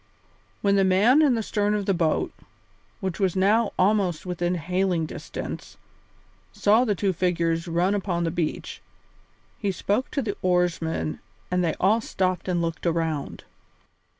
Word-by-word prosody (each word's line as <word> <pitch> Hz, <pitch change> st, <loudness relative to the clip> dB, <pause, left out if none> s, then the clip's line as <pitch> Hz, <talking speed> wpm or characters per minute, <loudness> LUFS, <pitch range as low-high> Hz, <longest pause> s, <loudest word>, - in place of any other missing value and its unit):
When 200 Hz, -1 st, +3 dB
the 195 Hz, -, +4 dB
man 205 Hz, +10 st, +5 dB
in 280 Hz, -5 st, +4 dB
the 225 Hz, -, -1 dB
stern 210 Hz, 0 st, 0 dB
of 205 Hz, -1 st, -2 dB
the 195 Hz, -, +2 dB
boat, 165 Hz, -3 st, 0 dB, 0.7 s
which 190 Hz, -3 st, -3 dB
was 190 Hz, -3 st, +1 dB
now 205 Hz, +4 st, +3 dB
almost 190 Hz, -4 st, +2 dB
within 175 Hz, 0 st, -1 dB
hailing 180 Hz, 0 st, 0 dB
distance, -, -, -7 dB, 0.7 s
saw 215 Hz, -, +3 dB
the 210 Hz, -4 st, +1 dB
two 195 Hz, +1 st, 0 dB
figures 170 Hz, -1 st, 0 dB
run 175 Hz, +4 st, +1 dB
down 205 Hz, -, 0 dB
upon 175 Hz, -3 st, -1 dB
the 165 Hz, -, 0 dB
beach, 165 Hz, -2 st, -3 dB, 0.8 s
he 200 Hz, -2 st, 0 dB
spoke 205 Hz, +7 st, -1 dB
to 280 Hz, -, -2 dB
the 205 Hz, -3 st, -3 dB
oarsmen 170 Hz, -, 0 dB, 0.3 s
and 180 Hz, 0 st, +1 dB
they 165 Hz, -, 0 dB
all 215 Hz, +5 st, +3 dB
stopped 185 Hz, -4 st, -1 dB
and 175 Hz, -2 st, 0 dB
looked 165 Hz, +1 st, -3 dB
around. 160 Hz, -3 st, -2 dB
185 Hz, 155 wpm, -25 LUFS, 170-205 Hz, 0.8 s, man